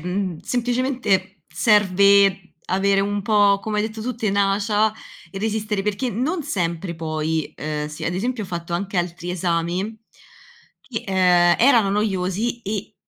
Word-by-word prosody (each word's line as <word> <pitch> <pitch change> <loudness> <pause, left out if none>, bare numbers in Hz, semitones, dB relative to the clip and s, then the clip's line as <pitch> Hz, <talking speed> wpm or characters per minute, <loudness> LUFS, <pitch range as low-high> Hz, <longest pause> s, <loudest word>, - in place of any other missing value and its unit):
mhmm, 180 0 -3
semplicemente 240 - -1
serve 200 -1 +4
avere 195 +1 +2
un 205 +1 -1
po', 205 -1 +3
come 215 0 -2
hai 215 - 0
detto 220 0 -9
tu, 250 +3 -3
tenacia 210 0 +1 0.4
e 195 - -6
resistere 215 -1 -2
perché 210 +5 -1
non 275 - -2
sempre 170 - -2
poi 160 -1 -2
uhm, 150 0 -3
si, 155 +1 -7
ad 170 - -1
esempio 225 +3 -2
ho - - -9
fatto 170 -1 -5
anche 195 +2 -3
altri 175 0 -2
esami 180 +4 -2 0.8
che, 230 -4 -6
ehm, 180 -2 +4
erano 230 -5 +5
noiosi 205 +3 -1
e 210 +1 -5
195 Hz, 140 wpm, -22 LUFS, 180-215 Hz, 0.8 s, erano